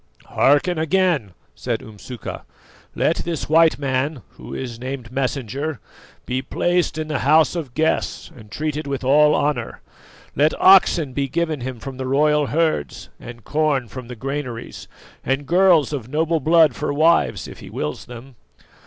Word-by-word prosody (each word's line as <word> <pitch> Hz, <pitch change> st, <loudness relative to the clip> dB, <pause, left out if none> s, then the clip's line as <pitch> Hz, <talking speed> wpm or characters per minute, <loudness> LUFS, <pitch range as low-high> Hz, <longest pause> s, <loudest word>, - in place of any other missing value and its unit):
"Hearken 145 Hz, +5 st, +2 dB
again," 160 Hz, -, +1 dB, 0.2 s
said -, -, -4 dB
Umsuka. 110 Hz, +3 st, -8 dB, 0.5 s
"Let -, -, +1 dB
this 165 Hz, -3 st, -4 dB
white 160 Hz, +1 st, +4 dB
man, 135 Hz, -1 st, -2 dB
who -, -, -12 dB
is 120 Hz, -3 st, -6 dB
named 130 Hz, -2 st, -6 dB
Messenger, 135 Hz, +1 st, -3 dB, 0.5 s
be 130 Hz, +1 st, -2 dB
placed 175 Hz, +4 st, 0 dB
in 155 Hz, -1 st, -3 dB
the 155 Hz, -3 st, -2 dB
House 155 Hz, +5 st, +4 dB
of 145 Hz, -8 st, -5 dB
Guests 160 Hz, +1 st, -1 dB
and 110 Hz, -5 st, -14 dB
treated 155 Hz, +4 st, -3 dB
with 140 Hz, -1 st, -3 dB
all 150 Hz, +3 st, +5 dB
honour; 150 Hz, 0 st, -1 dB, 0.6 s
let 150 Hz, +3 st, +2 dB
oxen 175 Hz, -7 st, +5 dB
be 140 Hz, +1 st, -1 dB
given 160 Hz, 0 st, -2 dB
him 125 Hz, -1 st, -5 dB
from 130 Hz, +3 st, -8 dB
the 130 Hz, 0 st, -4 dB
royal 150 Hz, +2 st, +2 dB
herds 155 Hz, -, -1 dB
and 120 Hz, -1 st, -11 dB
corn 150 Hz, -5 st, 0 dB
from 125 Hz, +2 st, -9 dB
the 125 Hz, -, -8 dB
granaries, 130 Hz, -1 st, -6 dB, 0.4 s
and 135 Hz, +2 st, -1 dB
girls 175 Hz, -4 st, +4 dB
of 125 Hz, -5 st, -5 dB
noble 160 Hz, +3 st, 0 dB
blood 155 Hz, -2 st, +4 dB
for -, -, -2 dB
wives 160 Hz, +4 st, +2 dB
if -, -, -11 dB
he -, -, -11 dB
wills 75 Hz, 0 st, -4 dB
them. 125 Hz, +2 st, -11 dB
145 Hz, 155 wpm, -21 LUFS, 130-155 Hz, 0.6 s, all